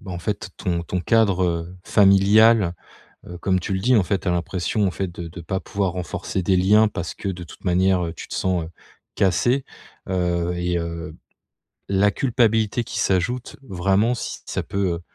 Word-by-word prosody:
bah, 95 -3 -8
en 85 - -4
fait, 100 +1 -4
ton 85 -2 -1
ton 90 +2 -3
cadre 90 -5 +1
familial, 100 0 +5 0.5
heu, 90 - -8
comme 95 +1 +1
tu 95 - -3
le 95 - -1
dis, 125 +5 +3
en 105 - +4
fait, 95 +1 -1
tu - - -3
as - - +3
l'impression, 90 +3 -1
en - - +1
fait, 95 +1 -3
de 85 -1 -7
de 85 +2 -10
pas 95 +4 -3
pouvoir 100 -4 -2
renforcer 90 +1 -4
des 95 +1 +2
liens, 105 +4 +5
parce 85 -4 -5
que, - - -5
de 90 -2 -5
toute - - -15
manière, 90 0 +2
heu, 80 - -6
tu - - -9
te - - -6
sens, 90 -3 0
heu, 80 - -10 0.4
cassé, 120 - +2 0.4
heu, 90 -1 0
et 90 0 -1
heu, 85 -1 -5 0.7
la 100 +1 +3
culpabilité 115 -3 +1
qui 120 - -6
s'ajoute, 105 +7 -1
vraiment, 100 +6 +2
si - - -5
ça - - -2
peut, 100 -3 -1
heu, 85 - -8
95 Hz, 195 wpm, -22 LUFS, 90-100 Hz, 0.7 s, familial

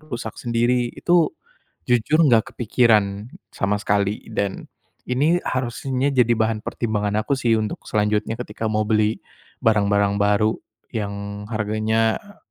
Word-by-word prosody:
rusak 120 -7 -6
sendiri. 120 +1 +1
Itu 175 -2 +2 0.6
jujur 125 +6 +3
enggak 115 -6 +3
kepikiran 110 -3 +2 0.2
sama 100 +1 0
sekali 100 0 0
dan 100 -1 -2 0.5
ini 150 +8 +2
harusnya 130 +1 -1
jadi 125 -3 +3
bahan 110 0 0
pertimbangan 105 -2 -1
aku - - -2
sih 115 -3 +2
untuk 110 -1 -3
selanjutnya 105 +1 0
ketika 110 -2 -5
mau 110 0 +1
beli 110 0 +1 0.4
barang-barang 100 -2 +2
baru 105 +2 +2 0.4
yang 100 -1 -5
harganya, 110 +1 +1
eee, 205 -1 -17
110 Hz, 125 wpm, -22 LUFS, 105-120 Hz, 0.6 s, jujur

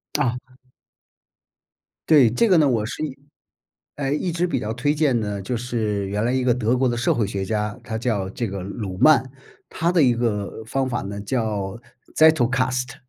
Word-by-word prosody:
啊。 125 -4 +1 1.7
对， 145 -7 +6
这 125 - +2
个 185 -4 +5
呢， 150 -3 +4
我 115 -5 +1
是， - - -5 1.0
哎， 140 -1 -2
一 170 +4 -1
直 175 +2 0
比 - - -1
较 110 +1 -3
推 135 +5 0
荐 145 -6 +2
的， 105 -2 -3
就 120 +6 -3
是 110 -4 -2
原 105 +2 -1
来 120 - +1
一 130 -1 0
个 125 - +3
德 120 0 +1
国 130 0 +2
的 120 - -2
社 115 - +2
会 110 -4 0
学 100 -1 -3
家， 105 +2 -2
他 110 -2 -4
叫 110 -5 -1
这 120 - -3
个 95 -1 -5
鲁 95 -1 -6
曼， 155 +8 +5 0.5
他 170 0 0
的 175 -2 +3
一 125 -2 +4
个 110 -2 -2
方 130 +3 -1
法 120 - -2
呢 100 +1 -6
叫 105 -3 -2 0.4
Zettelkasten 130 -4 +2
120 Hz, 250 characters per minute, -22 LUFS, 105-130 Hz, 1.7 s, 对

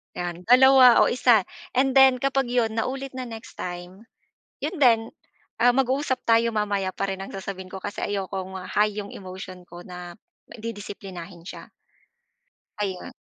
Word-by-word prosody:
'Yan, 175 0 -5
2 255 0 +7
o - - +3
1, 240 -3 +4 0.3
and 265 +2 +3
then 265 -2 +6
kapag 270 -1 +1
'yon 235 -2 0
naulit 270 +4 -3
na 255 - -4
next 225 +1 -10
time, 180 +4 -7 0.6
'yon 350 - -3
din, 235 -4 +6 0.6
ah, 245 +1 +4
mag-uusap 265 0 0
tayo 230 0 +4
mamaya 205 -3 -1
pa 185 - -3
rin 190 - -7
ang 195 - -6
sasabihin 190 -1 -7
ko, 190 - -8
kasi 205 - -5
ayokong, 190 -2 -4
ah, 185 - -7
high 210 +1 +1
yung 205 -1 -6
emotion 185 -1 -9
ko 175 +1 -11
na 180 -1 -9 0.4
didisiplinahin 195 -6 -8
siya. - - -10 1.1
Ayun. 190 -3 -4
210 Hz, 155 wpm, -24 LUFS, 185-245 Hz, 1.1 s, 2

